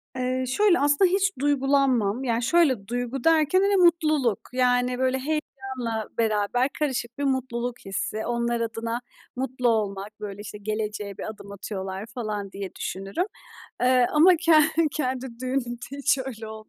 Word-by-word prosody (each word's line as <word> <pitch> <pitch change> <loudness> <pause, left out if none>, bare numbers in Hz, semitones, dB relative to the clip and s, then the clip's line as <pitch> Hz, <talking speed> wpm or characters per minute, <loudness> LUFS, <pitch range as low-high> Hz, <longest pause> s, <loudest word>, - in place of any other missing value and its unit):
Eee, 255 0 -1
şöyle, 370 +7 +3
aslında, 290 +6 +4
hiç 390 +1 +2
duygulanmam. 270 -5 +2
Yani, 235 -2 0
şöyle, 265 -7 +3
duygu 245 +2 -3
derken, 325 +2 +4
hani, 400 +1 +3
mutluluk, 310 - +3
yani, 250 0 +2
böyle, 260 0 +2
heyecanla 265 -6 -3
beraber 225 +3 +1
karışık 260 -5 -2
bir 285 - -2
mutluluk 245 -3 -1
hissi, 205 +2 -3
onlar 235 0 -1
adına 230 +1 -3 0.3
mutlu 255 -1 0
olmak, 210 -1 -2
böyle, 205 -1 -6
işte, 210 0 -8
"Geleceğe 210 -1 -4
bir - - -6
adım 205 -2 -10
atıyorlar." 195 -1 -5
falan 210 -5 -4
diye 195 -1 -7
düşünürüm. 195 - -3 0.6
Eee, 250 -1 +5
ama 345 +4 +6
ke 330 0 +2 0.4
kendi 260 -3 -2
düğünümde 250 -2 -3
hiç 280 0 +2
öyle 230 -4 -7
olmadı. 220 0 -10
245 Hz, 145 wpm, -25 LUFS, 215-275 Hz, 0.6 s, ama